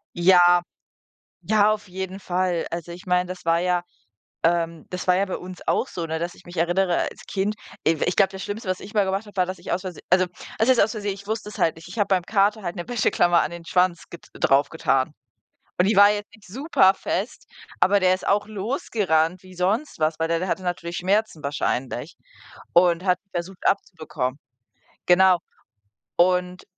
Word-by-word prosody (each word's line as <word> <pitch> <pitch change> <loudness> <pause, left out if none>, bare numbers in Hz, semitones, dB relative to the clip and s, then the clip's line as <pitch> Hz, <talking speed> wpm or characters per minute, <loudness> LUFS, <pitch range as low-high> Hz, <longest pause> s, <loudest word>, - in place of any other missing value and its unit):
Ja. 175 0 +6 0.8
Ja 215 0 +3
auf 210 -2 -5
jeden 190 +1 -6
Fall. 180 -2 -1
Also, 170 0 -5
ich 180 +2 -11
meine, 180 0 +2
das 185 -2 -8
war 165 0 +3
ja, 180 -1 +1 0.6
ähm 165 -1 0
das 180 0 -5
war 180 0 +4
ja 195 - +2
bei 190 - -4
uns 185 0 -9
auch - - +1
so, 170 -2 -4
ne? 160 0 -3
Dass 170 +2 -3
ich - - -19
mich 175 +1 -11
erinnere 175 +2 +2
als - - -14
Kind, 200 +2 -1 0.3
i 160 -2 +2
w - - +1
ich 180 - 0
glaube, 195 -2 +4
das 190 0 -7
Schlimmste, 205 -1 -5
was 185 - -1
ich 210 - -11
mal 210 -2 +3
gemacht 195 +3 -2
habe, 205 -1 -15
war, 185 - +2
dass 185 +1 -6
ich - - -7
aus 180 - -1
Vers 180 -4 -7
also, 185 +1 +4 0.3
was 225 +4 +2
heißt 255 - +5
aus 215 - +2
Versehen, 205 -2 -3
ich 200 +1 -13
wusste 220 -1 -3
es - - -10
halt 165 - +2
nicht. 165 +1 -13
Ich 205 +5 -7
habe 205 - +2
beim 190 -3 +2
Kater 205 +2 +2
halt 175 +1 -4
'ne 175 - -5
Wäscheklammer 175 -7 +3
an 155 - -2
den 170 -1 -9
Schwanz 180 0 +1
get 170 - -12
drauf 140 +1 +2
getan. 135 -3 0 0.7
Und 180 - +4
die 210 0 +2
war 205 +1 +8
jetzt 205 0 -4
nicht 215 -2 -18
super 195 - +3
fest, 200 +7 -4 0.3
aber 200 +1 +4
der 185 0 +4
ist 185 - -7
auch 205 +1 +2
losgerannt 190 - -1
wie 185 0 -14
sonst 200 - -1
was, 155 0 +1
weil 165 0 0
der 165 0 +1
der 185 - -3
hatte 185 - -2
natürlich 175 -1 -4
Schmerzen 195 -3 0
wahrscheinlich 140 -2 -3 0.6
und 175 0 +4
hat 180 -2 +2
die 195 - -48
versucht 180 +2 -5
abzubekommen. 155 -8 -1 0.7
Genau. 185 0 +5 0.8
Und, 180 +1 +2
185 Hz, 210 wpm, -24 LUFS, 175-200 Hz, 0.8 s, war